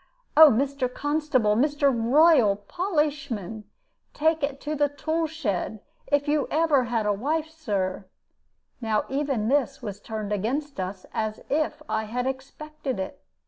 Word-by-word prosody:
'Oh, 315 0 +10
Mr. 265 +1 0
Constable, 290 -7 +1
Mr. 285 +2 +2
Rural 245 -1 +5
Polishman, 275 - -2 0.5
take 315 +1 +2
it 280 -1 -2
to 300 - -3
the 290 -1 +2
tool 315 +3 -1
shed, 220 - -3 0.3
if 285 0 +1
you 295 -1 +1
ever 305 -5 +3
had 230 -2 -1
a 210 - +2
wife, 305 +9 -1
Sir.' 200 -12 -2 0.8
Now 220 -2 0
even 270 -6 -1
this 275 0 +1
was 205 -2 -5
turned 215 -2 -4
against 265 +7 -2
us 185 0 -4
as 215 -1 -3
if 305 +1 0
I 220 0 -1
had 245 +3 -2
expected 265 -1 -5
it. 190 - -5
275 Hz, 145 wpm, -26 LUFS, 220-300 Hz, 0.8 s, Oh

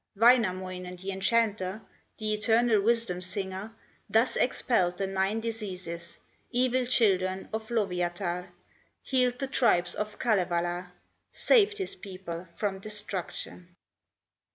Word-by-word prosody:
Wainamoinen, 185 -6 +3
the 190 +2 -5
enchanter, 200 0 +1 0.4
The 215 -1 -1
eternal 225 0 +3
wisdom 225 -4 +1
singer, 190 +3 -4 0.3
Thus 225 +3 +3
expelled 185 -8 +1
the 195 - -1
nine 195 +3 0
diseases, 185 -7 -5 0.3
Evil 255 0 +1
children 190 -6 +2
of 220 0 -4
Lowyatar, 180 -4 -1 0.5
Healed 250 -2 +2
the 270 - -2
tribes 195 -10 +2
of 210 0 -4
Kalevala, 180 -4 0 0.4
Saved 425 -3 +4
his 395 0 -3
people 185 - -7
from 200 -2 -2
destruction. 190 -3 -5
200 Hz, 105 wpm, -29 LUFS, 180-230 Hz, 0.5 s, Saved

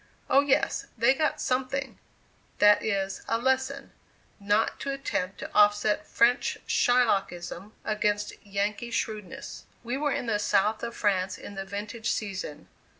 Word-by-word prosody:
Oh, 275 - +7
yes! 285 -1 +1
they 235 +4 +5
got 305 +2 0
something, 265 +1 -2 0.6
that 205 0 +6
is, 195 -2 -1
a 230 - +1
lesson, 265 +3 0 0.5
not 205 +2 +1
to 280 - -4
attempt 195 -9 -3
to - - -7
offset 210 0 +3
French 240 +1 +2
Shylockism 200 -6 +1
against 210 -1 0
Yankee 200 +3 -2
shrewdness. 215 -4 -4 0.2
We 240 +2 -2
were 295 0 0
in - - -2
the 215 -3 0
South 210 +1 +2
of 235 - -5
France 190 -3 0
in - - -9
the 195 -1 -5
vintage 205 +3 -4
season. 190 -8 -4
215 Hz, 140 wpm, -28 LUFS, 200-250 Hz, 0.6 s, Oh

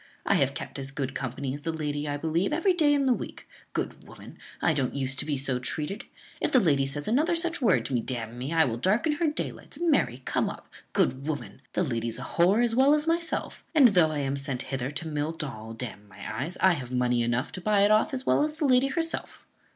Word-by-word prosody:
"I - - +3
have - - +2
kept - - -6
as 135 0 -5
good 135 -1 -3
company 130 0 -3
as 145 - -6
the 165 +2 -2
lady, 150 -2 -3
I 145 0 -1
believe, 165 +5 0
every 345 +5 +2
day 310 -4 +3
in 285 -1 +3
the 260 - +4
week. - - -7 0.3
Good - - -3
woman! - - -13 0.2
I 160 - +3
don't 135 -3 -1
use 135 -1 +1
to 140 +1 +1
be 145 -2 0
so 130 -2 0
treated. 150 - -4 0.4
If - - +1
the 260 - +6
lady 140 - +2
says 145 +2 -3
such - - -1
another 315 +8 +3 0.3
word 135 - +3
to 140 - -4
me, 120 - +2
d 125 +2 -3
n 115 0 -6
me, 130 +4 -4
I 165 -1 +4
will 115 -2 -2
darken 210 - +2
her 315 +2 0
daylights. 300 - -4
Marry, 270 - +1
come - - 0
up! - - -9 0.3
Good 135 +2 +1
woman! 145 -3 -4
the - - +1
lady's 115 -6 -2
a - - -6
whore 190 +7 +3
as 235 -1 +1
well 270 +5 +5
as 300 0 0
myself! 335 +1 -2
and, 275 -6 +8
though 180 -6 +4
I 155 - -3
am 140 -1 -1
sent 135 -2 -3
hither 130 0 -1
to 145 +3 -4
mill 150 +1 -2
doll, 115 -9 -6
d 125 - -3
n 105 -3 -10
my 105 +4 -6
eyes, 175 +3 -5
I 190 - +6
have 130 -7 -3
money 125 -1 +1
enough 120 +3 0
to 185 - -7
buy 210 +1 +3
it 205 +1 +5
off 215 0 +4
as 265 -1 -3
well - - +3
as 305 0 -2
the 315 - 0
lady 255 0 +4
herself." 330 +3 -3
150 Hz, 250 wpm, -27 LUFS, -, 0.4 s, and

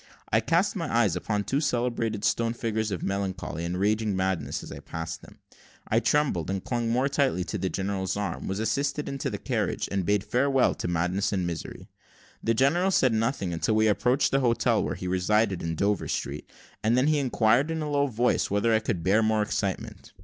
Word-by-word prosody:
I 110 - +4
cast 170 - +1
my 165 -5 -3
eyes 115 -7 +3
upon 105 +3 -1
the - - -8
two 140 +2 0
celebrated 120 -6 -1
stone 115 0 +1
figures 110 -2 -1
of 95 -4 -4
Melancholy 95 -4 -3
and 90 +1 -2
Raving 105 +1 +1
Madness; 95 -1 -1
as - - -9
I - - -7
passed 80 0 -6
them, - - -15 0.5
I - - +3
trembled, 140 - +1
and 95 -1 -2
clung 120 -2 -1
more 125 +4 +2
tightly 140 -9 +1
to - - -4
the 95 - -1
general's 95 0 -2
arm, 105 -1 -3
was 95 - -2
assisted 140 +7 -1
into 135 0 -3
the - - -4
carriage, - - -2
and 100 -1 0
bade 100 +2 +1
farewell 135 +3 +2
to - - -4
madness 90 +3 0
and 95 -3 0
misery. 85 -2 -6 0.6
The 115 - +2
general 160 - +3
said 130 -10 +3
nothing 110 -5 0
until 95 +6 0
we 110 0 +3
approached 125 +6 +2
the 135 - +3
hotel 120 -3 +2
where - - -2
he 90 - -5
resided, 95 +2 +1
in 80 0 -2
Dover 100 +3 0
Street; - - -4 0.3
and 115 +3 +3
then 130 - +3
he 155 0 +3
inquired, 125 +1 +2
in 160 -1 -2
a 150 - -3
low 145 0 +2
voice, 120 0 +1
whether 105 +3 +2
I 110 - +4
could 105 -6 -3
bear 100 +4 +3
more 110 -1 +2
excitement. 100 -2 -4
110 Hz, 210 wpm, -27 LUFS, 95-125 Hz, 0.6 s, I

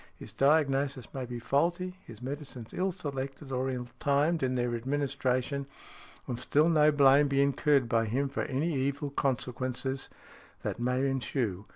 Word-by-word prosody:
His - - -10
diagnosis 135 -3 +2
may 130 -2 -4
be 120 0 -5
faulty, 175 +9 0
his 115 +1 -11
medicines 135 -4 -6
ill 190 +1 0
selected, 140 -5 -5
or 130 0 0
ill 125 -2 -3
timed 150 +4 +2
in 130 -1 0
their 120 -1 0
administration, 135 +1 -1 0.6
and 120 -1 -3
still 150 +3 +3
no 155 -2 +5
blame 145 0 +6
be 140 0 +1
incurred 140 -1 +3
by 115 -1 +2
him 130 +6 0
for 135 - -3
any 150 +6 -1
evil 140 +1 -1
consequences 130 0 -2 0.5
that - - -3
may 125 +3 +1
ensue. 120 -7 -2
135 Hz, 155 wpm, -30 LUFS, 125-145 Hz, 0.6 s, blame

